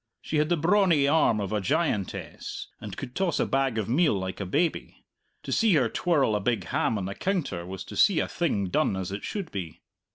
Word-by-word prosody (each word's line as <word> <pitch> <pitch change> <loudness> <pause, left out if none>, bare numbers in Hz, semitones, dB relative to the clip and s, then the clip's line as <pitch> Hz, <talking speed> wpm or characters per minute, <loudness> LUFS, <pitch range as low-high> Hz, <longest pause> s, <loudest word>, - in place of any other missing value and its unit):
She 155 - -3
had 150 +1 +2
the 175 - +2
brawny 170 -3 +3
arm 145 -7 +3
of 100 0 -3
a 105 - 0
giantess, 140 - -2
and - - -7
could 125 -2 -6
toss 190 +1 0
a - - +2
bag 135 -3 0
of 110 - -1
meal 145 +3 +3
like 95 0 -4
a 95 - -3
baby; 160 - -1 0.4
to - - -6
see 220 -6 +3
her 135 - +3
twirl 145 -11 +1
a - - +1
big 115 +3 0
ham 115 - 0
on 95 - -3
the 100 - -4
counter 140 - -2
was 95 0 -6
to - - -10
see 195 -6 +4
a - - 0
thing 105 - -1
done 95 - +1
as 95 -1 -4
it 100 - -5
should 200 -5 -4
be. 90 -5 -6
135 Hz, 225 wpm, -27 LUFS, -, 0.4 s, see